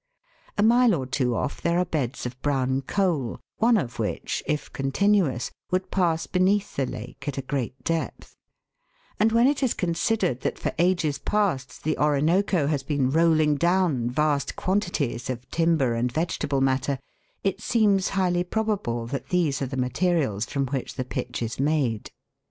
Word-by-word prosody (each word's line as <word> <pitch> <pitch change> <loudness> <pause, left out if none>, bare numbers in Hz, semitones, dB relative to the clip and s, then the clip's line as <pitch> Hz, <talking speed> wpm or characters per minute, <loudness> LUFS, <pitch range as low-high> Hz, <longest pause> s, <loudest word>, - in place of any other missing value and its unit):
A 205 - +3
mile 235 -1 +5
or 135 -5 -3
two 125 -2 0
off - - -3
there 170 0 +1
are 180 - +2
beds 140 -8 -2
of 125 +1 -6
brown 135 -2 +1
coal, 160 - -1 0.2
one 230 +1 +4
of 125 - -3
which, - - -2
if 150 -1 -2
continuous, 140 -1 +1 0.2
would 185 +1 -1
pass 170 -4 +1
beneath 195 +2 +1
the 135 -2 0
lake 125 +6 -8
at 140 - -3
a - - -1
great 130 -2 -3
depth; 165 -1 -3 0.8
and 220 +1 +4
when 230 +2 +4
it 285 +1 +2
is 260 -4 +1
considered 175 - 0
that - - -2
for - - -2
ages 170 -4 +2
past 185 -11 -1
the 155 0 0
Orinoco 155 +4 +2
has 145 -1 0
been 135 -2 0
rolling 155 -2 +3
down 170 -7 +2
vast 140 +1 0
quantities 175 - -1
of 125 -1 -4
timber 165 -7 +2
and 120 +2 0
vegetable 145 -2 -1
matter, 135 +1 +1 0.5
it 195 - -1
seems 205 -5 +2
highly 175 -2 +2
probable 185 - -1
that 130 +2 -5
these 165 -7 +1
are 135 - 0
the 130 +1 -5
materials 125 - 0
from 140 -1 -1
which 135 0 -4
the 130 - -3
pitch 120 -1 -4
is 115 +2 -4
made. 135 -7 0
150 Hz, 165 wpm, -25 LUFS, 130-185 Hz, 0.8 s, mile